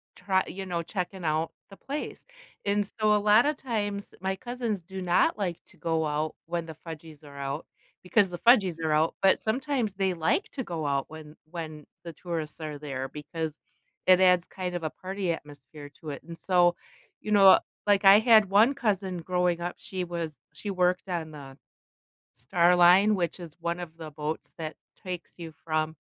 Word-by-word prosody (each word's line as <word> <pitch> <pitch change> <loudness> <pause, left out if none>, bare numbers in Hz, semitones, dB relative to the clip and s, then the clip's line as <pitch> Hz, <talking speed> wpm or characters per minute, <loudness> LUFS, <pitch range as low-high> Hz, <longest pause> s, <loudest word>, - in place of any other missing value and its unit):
try 190 0 +1
you 190 +2 -6
know, 170 -2 -2
checking 185 0 -4
out 155 +1 0 0.2
the 195 - -13
place, 285 +2 -6 0.4
and 205 0 +1
so 215 0 +1
a - - +4
lotta 215 +8 +4
times, 205 -7 -3
my 190 0 -1
cousins 240 -4 -3
do 190 +1 -7
not 180 +3 +2
like 180 -5 -2
to - - -20
go 160 -1 0
out 150 +1 -2
when 170 0 -3
the 160 - -8
"fudgies" 160 -2 -9
are 140 -1 -12
out 140 +2 -4 0.4
because 195 +1 +3
the 175 - -6
"fudgies" 200 -9 +5
are 160 - +1
out, 155 +2 +2
but 195 -1 +5
sometimes 245 -2 -1
they 190 -1 0
like 170 - +1
to 265 - -3
go 165 -7 -4
out 140 -1 0
when 155 -1 -11 0.2
when 155 -3 -7 0.2
the 170 -1 -7
tourists 165 -2 -5
are 150 -2 -5
there, 135 -3 -4
because 155 +1 -5 0.5
it 185 0 +7
adds 180 -2 +5
kind 180 -2 -5
of 175 - -4
a 155 - -1
party 190 -1 -3
atmosphere 145 -1 -11
to 155 - -7
it, 140 - -8
and 165 +1 -9
so, 175 0 +3 0.5
you 210 - -5
know 195 -2 +8 0.3
like, 205 0 +4
I 195 +1 +9
had 220 -3 +6
one 220 +7 +5
cousin 195 -8 -1
growing 180 0 0
up, 175 +1 -3
she 185 -1 -5
was 170 -2 -4 0.2
she 200 +7 -5
worked 180 0 +1
on 165 -3 -3
the 140 -2 -11 0.8
Star 170 - +3
Line, 185 +4 +6
which 175 0 -2
is 170 -3 -9
one 170 +1 -2
of 165 -2 -7
the 160 -2 -8
boats 150 +1 -4
that 155 -1 -5 0.3
takes 180 -2 -6
you 165 -2 -8
from 155 0 -1
175 Hz, 190 wpm, -28 LUFS, 160-195 Hz, 0.8 s, I